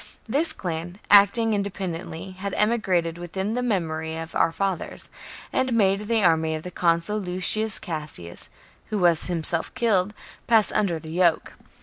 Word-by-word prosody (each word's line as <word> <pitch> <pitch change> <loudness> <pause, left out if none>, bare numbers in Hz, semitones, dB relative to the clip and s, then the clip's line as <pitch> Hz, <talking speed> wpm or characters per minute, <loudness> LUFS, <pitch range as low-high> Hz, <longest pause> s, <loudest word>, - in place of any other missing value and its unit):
This 285 +9 +1
clan, 175 0 -5
acting 205 +3 +6
in 205 - +1
dependently, 185 -3 -5
had 190 +1 -5
emigrated 185 -7 +1
within 190 +4 -3
the 250 - -1
memory 160 -8 -2
of 165 0 -7
our 165 - +2
fathers, 190 0 -3 0.4
and 260 -1 +1
made 205 -2 +2
the 225 -2 +2
army 160 -2 +2
of 155 - -6
the 180 - -7
consul, 170 +4 +1
Lucius 195 +3 +2
Cassius, 150 - -5 0.4
who 215 - -2
was 175 -4 +3
himself 170 -1 -1
killed, 210 -5 +1 0.3
pass 225 -3 +4
under 185 -5 +1
the 160 0 -9
yoke. 170 -1 +1
185 Hz, 150 wpm, -24 LUFS, 165-210 Hz, 0.4 s, acting